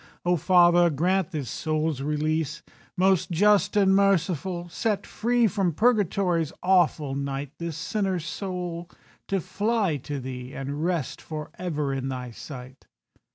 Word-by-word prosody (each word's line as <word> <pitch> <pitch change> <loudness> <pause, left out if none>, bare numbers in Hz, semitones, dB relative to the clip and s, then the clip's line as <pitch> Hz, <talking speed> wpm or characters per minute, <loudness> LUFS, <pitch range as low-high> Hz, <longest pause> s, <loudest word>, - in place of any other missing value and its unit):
"O 175 0 +3
Father, 175 0 +5
grant 180 +4 +1
this 145 -5 -4
soul's 155 -3 -1
release. 150 +1 -1 0.3
"Most 190 0 +3
Just 205 +3 +3
and 195 -1 +5
Merciful, 185 -2 +1
set 210 +4 -1
free 240 +1 +1
From 195 -5 +1
Purgatory's 195 - +2
awful 175 -6 +3
night 140 0 -3
This 170 -2 -4
sinner's 190 -6 -1
soul, 175 -2 -4 0.4
to 195 - 0
fly 205 -3 0
to 140 +1 -5
Thee, 125 0 -7
And 140 +3 -4
rest 170 -5 -1
for 155 -1 -6
ever 150 -6 -2
in 135 0 -3
Thy 125 -2 -5
sight." 130 +1 -10
170 Hz, 135 wpm, -26 LUFS, 145-190 Hz, 0.4 s, Father